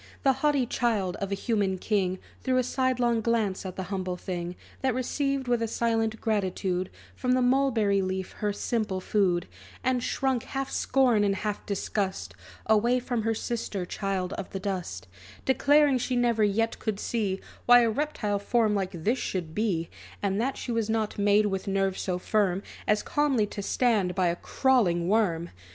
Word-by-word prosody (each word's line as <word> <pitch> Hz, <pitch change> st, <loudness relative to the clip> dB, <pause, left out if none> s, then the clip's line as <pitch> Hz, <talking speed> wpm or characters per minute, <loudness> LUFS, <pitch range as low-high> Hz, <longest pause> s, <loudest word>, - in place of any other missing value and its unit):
The 270 Hz, -, +5 dB
haughty 290 Hz, -4 st, +3 dB
child 220 Hz, -7 st, 0 dB
of 200 Hz, 0 st, -4 dB
a -, -, +1 dB
human 200 Hz, -3 st, 0 dB
king 190 Hz, -2 st, 0 dB, 0.2 s
Threw 255 Hz, 0 st, +1 dB
a 255 Hz, -, +3 dB
sidelong 250 Hz, -2 st, +1 dB
glance 215 Hz, -5 st, 0 dB
at 185 Hz, -, -7 dB
the 190 Hz, -, -3 dB
humble 185 Hz, -2 st, -2 dB
thing, 175 Hz, -1 st, -4 dB, 0.3 s
That 260 Hz, -2 st, +1 dB
received 275 Hz, +1 st, -1 dB
with 240 Hz, -1 st, +1 dB
a 230 Hz, -, 0 dB
silent 225 Hz, -1 st, 0 dB
gratitude 190 Hz, -3 st, -1 dB, 0.3 s
From 250 Hz, -1 st, 0 dB
the 255 Hz, -, +3 dB
mulberry 245 Hz, -6 st, +3 dB
leaf 185 Hz, 0 st, -3 dB
her 210 Hz, -1 st, 0 dB
simple 210 Hz, -2 st, -1 dB
food; 185 Hz, -3 st, +1 dB, 0.4 s
And 255 Hz, -1 st, +1 dB
shrunk, 260 Hz, 0 st, 0 dB
half 270 Hz, +2 st, -4 dB
scorn, 250 Hz, -6 st, +3 dB
and 200 Hz, -1 st, +2 dB
half 210 Hz, 0 st, -3 dB
disgust, 200 Hz, -1 st, -2 dB, 0.3 s
Away 235 Hz, +4 st, +3 dB
from 245 Hz, -2 st, -2 dB
her 225 Hz, +1 st, 0 dB
sister 215 Hz, -5 st, -3 dB
child 190 Hz, -1 st, -2 dB
of -, -, -5 dB
the 195 Hz, -, -5 dB
dust; 180 Hz, -, -4 dB, 0.4 s
Declaring 285 Hz, 0 st, +4 dB
she 250 Hz, +1 st, -1 dB
never 235 Hz, -3 st, +2 dB
yet 225 Hz, +3 st, +1 dB
could 215 Hz, -3 st, -2 dB
see 205 Hz, -5 st, -1 dB, 0.3 s
Why 245 Hz, 0 st, +9 dB
a 230 Hz, -, +3 dB
reptile 215 Hz, -7 st, -1 dB
form 220 Hz, +1 st, +2 dB
like 190 Hz, -4 st, -3 dB
this 240 Hz, +7 st, +1 dB
should 170 Hz, -4 st, -3 dB
be; 185 Hz, -6 st, 0 dB, 0.4 s
And 200 Hz, +1 st, +1 dB
that 265 Hz, +2 st, -1 dB
she 245 Hz, -, -4 dB
was 225 Hz, -2 st, 0 dB
not 220 Hz, -2 st, -1 dB
made 205 Hz, +1 st, +4 dB
with 195 Hz, -1 st, -2 dB
nerves 195 Hz, -1 st, 0 dB
so 180 Hz, -2 st, -1 dB
firm, 195 Hz, 0 st, +1 dB, 0.2 s
As 210 Hz, 0 st, +2 dB
calmly 285 Hz, -7 st, +2 dB
to 205 Hz, 0 st, -6 dB
stand 205 Hz, -5 st, +1 dB
by 185 Hz, -2 st, +2 dB
a 170 Hz, -, 0 dB
crawling 180 Hz, -7 st, +2 dB
worm! 180 Hz, -5 st, +1 dB
210 Hz, 175 wpm, -27 LUFS, 190-245 Hz, 0.4 s, Why